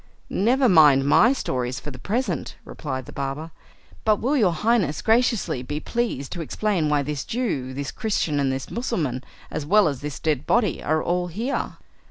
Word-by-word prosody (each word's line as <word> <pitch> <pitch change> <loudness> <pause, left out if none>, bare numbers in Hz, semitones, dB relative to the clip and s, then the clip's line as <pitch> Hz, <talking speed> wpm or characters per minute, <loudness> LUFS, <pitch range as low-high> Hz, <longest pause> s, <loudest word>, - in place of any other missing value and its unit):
"Never 250 +6 +3
mind 150 - +6
my 215 - +5
stories 125 - -2
for 150 - -7
the 130 - -10
present," 235 - -2
replied 130 -4 -5
the - - -10
barber, 140 +4 -4 0.5
"but 215 -1 +4
will 260 +8 0
your 210 -10 +4
Highness 195 -4 +1
graciously 225 - +2
be 145 +4 -4
pleased 225 - -2
to 175 - -4
explain 175 -1 0
why 145 -1 +2
this 145 -1 -3
Jew, 190 - -2
this 140 0 -4
Christian, 200 -10 -1
and 135 -1 +1
this 130 0 -4
Mussulman, 160 - -2 0.3
as - - -3
well 205 +6 +4
as 140 -4 -3
this 145 -2 -5
dead 150 -4 -1
body, 220 -8 +2
are 155 +1 0
all 180 0 0
here?" 225 +10 -3
160 Hz, 180 wpm, -24 LUFS, 140-220 Hz, 0.5 s, mind